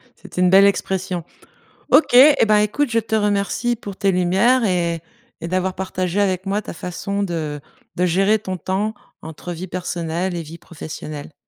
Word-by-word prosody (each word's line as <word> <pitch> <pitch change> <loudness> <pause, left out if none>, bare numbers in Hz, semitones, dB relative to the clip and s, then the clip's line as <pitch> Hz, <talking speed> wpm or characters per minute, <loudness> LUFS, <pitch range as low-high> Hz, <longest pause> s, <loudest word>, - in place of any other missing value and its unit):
c'est - - -14
une 180 0 +4
belle 195 +1 +7
expression. 190 -3 -1 0.7
OK 315 - +5
et 275 +1 +7
ben, 210 -1 +4
écoute, 210 +7 +1
je 230 - +2
te 220 0 -2
remercie 210 +3 0
pour 200 -4 -8
tes 200 -1 +1
lumières 195 +8 +3
et 170 -4 0 0.4
et 170 - -3
d'avoir 185 +1 -1
partagé 185 0 -3
avec 190 -1 0
moi 205 +2 -1
ta - - -7
façon 200 +4 -4
de 155 -5 -3 0.3
de 180 - +1
gérer 195 +5 +3
ton 190 -3 -5
temps 195 +4 -2 0.3
entre 160 +2 -7
vie 175 +2 -6
personnelle 175 0 -3
et 170 - -3
vie 165 +2 -10
professionnelle. 155 -2 -8
185 Hz, 170 wpm, -20 LUFS, 175-205 Hz, 0.7 s, belle